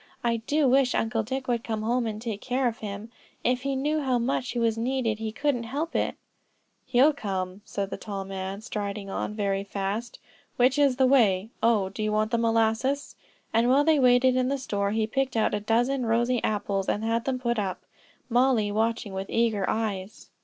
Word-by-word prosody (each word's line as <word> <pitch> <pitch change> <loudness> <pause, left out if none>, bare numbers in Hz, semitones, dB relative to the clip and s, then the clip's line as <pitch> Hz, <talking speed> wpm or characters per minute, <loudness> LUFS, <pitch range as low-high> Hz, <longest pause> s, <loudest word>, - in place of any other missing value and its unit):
I 235 -1 +1
do 285 +6 +1
wish 260 0 +3
Uncle 225 0 0
Dick 260 +4 -4
would 235 -2 0
come 220 -1 -3
home 235 +1 +1
and 215 -1 -4
take 220 -3 -5
care 255 0 0
of 230 -1 -3
him. 210 +1 -6 0.3
If 250 0 +1
he 275 0 -1
knew 300 +4 0
how 260 -3 +1
much 250 +1 -1
he - - -4
was 230 -2 +2
needed 230 -2 -1
he 220 -1 -3
couldn't 270 -1 -1
help 295 +8 -3
it." - - 0 0.7
"He'll 260 +4 +5
come," 190 -5 -4
said 200 -1 -4
the - - -3
tall 200 -2 -5
man, 195 +1 -5
striding 205 -3 -4
on 210 - -3
very 195 -2 -1
fast; 200 +3 -4 0.4
"which 255 +3 +3
is 280 -3 +4
the 260 0 +3
way? 220 -6 +3
Oh, 215 -5 +2
you 215 -1 -1
want 215 +1 +1
the 235 - +1
molasses;" 230 +4 +1 0.4
and 230 +2 +3
while 275 +3 +5
they 315 -1 +4
waited 250 0 +5
in 255 0 +1
the 280 - 0
store, 200 -6 -1
he 220 +1 +1
picked 260 +2 -1
out 220 - +2
a 210 - +1
dozen 240 +4 +1
rosy 235 +2 +1
apples 200 -2 -1
and 210 - -1
had 230 +1 0
them 265 -1 0
put 240 -2 -1
up; 190 -3 -3 0.4
Mollie 240 -4 +2
watching 220 -1 -1
with 190 0 -4
eager 225 -4 +1
eyes. 210 -3 -3
230 Hz, 200 wpm, -26 LUFS, 210-255 Hz, 0.7 s, He'll